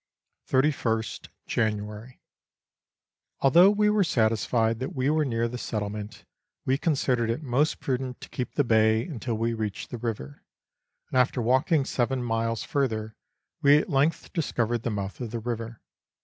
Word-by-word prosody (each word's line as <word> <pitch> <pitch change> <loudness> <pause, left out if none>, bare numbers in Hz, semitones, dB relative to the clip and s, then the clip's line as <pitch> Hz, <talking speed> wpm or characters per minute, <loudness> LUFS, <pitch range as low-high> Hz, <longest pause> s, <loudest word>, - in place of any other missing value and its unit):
31 130 -5 +2
st - - -8 0.2
January. 105 +2 -2 1.2
Although 170 +8 +7
we 210 +1 +2
were 210 -1 +3
satisfied 115 - +1
that 130 - -4
we 130 +2 +1
were 155 0 +2
near 115 -3 0
the 125 +1 -6
settlement, 105 0 -5 0.4
we 130 - +2
considered 130 -7 +1
it 120 +7 -2
most 145 +4 +1
prudent 130 -1 -3
to - - -10
keep 125 - -5
the 145 - +3
bay 110 -1 +3
until 125 -6 -4
we 115 +1 0
reached 110 -3 -4
the 120 - -5
river, 105 - -5 0.7
and 130 - +3
after 125 0 +2
walking 130 +5 +2
seven 130 0 -1
miles 115 -1 -1
further, 110 -6 -1 0.5
we 145 +1 +7
at 155 - -1
length 145 +4 +1
discovered 120 -8 -1
the 120 - -2
mouth 100 +1 -4
of 120 - -3
the 115 - -4
river. 115 0 -5
120 Hz, 155 wpm, -27 LUFS, 110-135 Hz, 1.2 s, Although